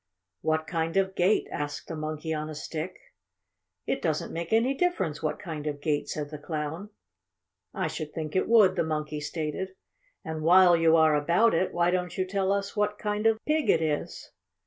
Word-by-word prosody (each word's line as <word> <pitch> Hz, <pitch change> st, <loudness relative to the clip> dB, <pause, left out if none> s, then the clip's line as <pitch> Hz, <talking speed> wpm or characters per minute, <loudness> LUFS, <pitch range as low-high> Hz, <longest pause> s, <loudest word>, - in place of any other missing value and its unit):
"What 160 Hz, 0 st, 0 dB
kind 165 Hz, +1 st, -2 dB
of 190 Hz, 0 st, +2 dB
gate?" 190 Hz, +3 st, +2 dB
asked 145 Hz, 0 st, -4 dB
the 165 Hz, -, -5 dB
Monkey 155 Hz, +1 st, -4 dB
on 155 Hz, 0 st, -3 dB
a 155 Hz, -, -6 dB
Stick. 160 Hz, +4 st, -5 dB, 0.9 s
"It -, -, -1 dB
doesn't -, -, -1 dB
make 170 Hz, 0 st, -4 dB
any 230 Hz, +4 st, +3 dB
difference 270 Hz, -, -1 dB
what 150 Hz, -1 st, -1 dB
kind 155 Hz, -6 st, -6 dB
of 145 Hz, -1 st, -3 dB
gate," 145 Hz, 0 st, -1 dB
said 150 Hz, -1 st, -4 dB
the 150 Hz, -, -7 dB
Clown. 155 Hz, +5 st, -4 dB, 0.8 s
"I -, -, -2 dB
should 155 Hz, -2 st, -4 dB
think 155 Hz, 0 st, -5 dB
it 185 Hz, -, +1 dB
would," 210 Hz, -5 st, +6 dB
the 170 Hz, -, +1 dB
Monkey 150 Hz, -1 st, -3 dB
stated. 160 Hz, +5 st, -4 dB, 0.5 s
"And 160 Hz, -1 st, -4 dB
while 175 Hz, +2 st, +7 dB
you 165 Hz, -1 st, +4 dB
are 160 Hz, -1 st, +5 dB
about 170 Hz, +10 st, +3 dB
it, 175 Hz, +3 st, +1 dB
why 175 Hz, 0 st, +2 dB
don't 180 Hz, -1 st, -2 dB
you 185 Hz, -, +1 dB
tell 195 Hz, 0 st, 0 dB
us 200 Hz, +1 st, -1 dB
what 210 Hz, 0 st, 0 dB
kind 210 Hz, +1 st, 0 dB
of 225 Hz, -1 st, +3 dB
pig 305 Hz, 0 st, +1 dB
it -, -, +5 dB
is?" 150 Hz, -2 st, -3 dB
165 Hz, 190 wpm, -27 LUFS, 155-190 Hz, 0.9 s, while